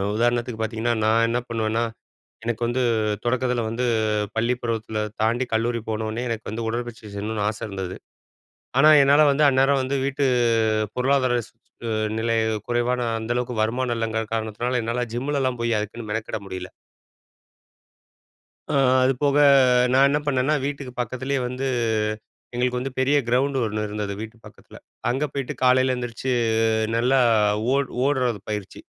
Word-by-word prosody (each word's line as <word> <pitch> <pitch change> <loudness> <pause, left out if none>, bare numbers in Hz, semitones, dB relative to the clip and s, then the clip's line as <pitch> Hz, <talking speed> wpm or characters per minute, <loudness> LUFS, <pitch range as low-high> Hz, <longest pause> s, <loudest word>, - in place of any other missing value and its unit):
உதாரணத்துக்கு 120 0 0
பாத்தீங்கன்னா 115 +1 -1
நான் 115 +1 +4
என்ன 120 +1 0
பண்ணுவேன்னா, 115 0 0 0.6
எனக்கு 115 0 -3
வந்து 125 +2 0 0.4
தொடக்கத்துல 125 0 0
வந்து, 120 +3 -2 0.5
பள்ளி 115 +2 +1
பருவத்துல 110 -2 -3 0.2
தாண்டி 120 +4 +1
கல்லூரி 115 +1 0
போனனே 110 +2 -2
எனக்கு 115 -2 -4
வந்து, 115 +2 -4
உடற்பயிற்சி 120 0 -4
செய்யணும்னு 105 +1 -3
ஆசை 110 - -6
இருந்தது. 95 -2 -5 0.8
ஆனா, 150 - +7
என்னால 145 +2 +5
வந்து 150 +2 +3
அந்நேரம் 135 +1 +3
வந்து 135 +2 -1
வீட்டு 140 +1 -1 0.7
பொருளாதார 130 -1 +2
ஸ் - - -26 0.7
நிலை 115 0 0 0.3
குறைவான 120 +1 0 0.2
அந்தளவுக்கு, 120 +2 -2
வருமானம் 120 +2 -1
இல்லைங்கிற 110 0 -1
காரணத்தினால 115 +3 -1
என்னால 120 +2 -1
ஜிம்முலலாம் 130 -1 -1
போயி, 115 0 0
அதுக்குன்னு 110 +2 -5
மெனக்கிட 110 0 -3
முடியல. 90 -1 -6 2.0
அ - - -1 0.3
அது 130 +1 +3
போக 145 -1 +2 0.6
நான் 135 +1 +6
என்ன 145 +1 +1
பண்ணேன்னா, 140 +1 +1
வீட்டுக்கு 140 -2 -4
பக்கத்திலயே 130 +3 -2
வந்து 125 +2 -4 0.9
எங்களுக்கு 125 +1 0
வந்து, 135 +2 -4
பெரிய 135 +3 +3
கிரவுண்ட் 135 +3 +1
ஒண்ணு 110 0 -2
இருந்தது 105 -1 -4
வீட்டு 110 +1 -8
பக்கத்துல. 105 - -15 0.3
அங்கே 135 +5 0
போயிட்டு 140 -2 -3
காலையில 130 0 +4
எந்திரிச்சி 125 +1 -4 0.7
நல்லா 125 +3 +3 0.6
ஓட் 140 -1 0 0.2
ஓடுறது 125 -7 0
பயிற்சி. 105 -3 -5
120 Hz, 135 wpm, -23 LUFS, 110-130 Hz, 2.0 s, ஆனா